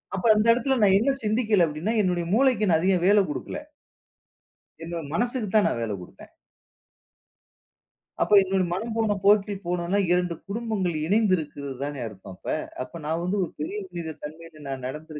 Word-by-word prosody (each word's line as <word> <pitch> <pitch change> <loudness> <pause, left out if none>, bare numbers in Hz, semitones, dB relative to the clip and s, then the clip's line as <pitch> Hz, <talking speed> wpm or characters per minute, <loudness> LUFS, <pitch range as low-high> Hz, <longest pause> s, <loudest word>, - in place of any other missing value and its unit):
அப்போ 195 +4 -1
அந்த 215 +1 +2
இடத்துல 260 +3 0
நான் 195 -1 +6
என்ன 275 +5 +2
சிந்திக்கல 215 -4 +3
அப்படின்னா 155 +9 -2
என்னுடைய 180 -3 0
மூளைக்கு 235 -5 +3
நான் 160 - +4
அதிகம் 180 0 +2
வேலை 205 0 +6
குடுக்கல. 150 - -5 1.2
என்னோட 170 0 -4
மனசுக்கு 240 +1 -1
தான் 215 - +5
நான் - - -1
வேலை 110 -2 -2
குடுத்தேன். 90 - -14 1.9
அப்போ - - +2
என்னோட 190 0 0
மனம் 220 +6 -3
போன 220 -2 +1
போக்கில் 205 -1 +3
போனோம்னா 180 +3 0
இரண்டு 180 -1 +1
குடும்பங்கள் 200 -5 -2
இணைந்திருக்கிறதுதானே 145 - -1
அர்த்தம் 95 -2 -11
அப்ப - - -3 0.3
அப்போ 170 - -10
நான் 165 +3 -1
வந்து 195 +3 -1
ஒரு 170 - -5
பெரிய 200 +7 -3
மனித 170 -2 -5
தன்மையில் 155 0 -10
நான் 130 -2 -5
நடந்து 155 +4 -8
185 Hz, 155 wpm, -25 LUFS, 160-210 Hz, 1.9 s, நான்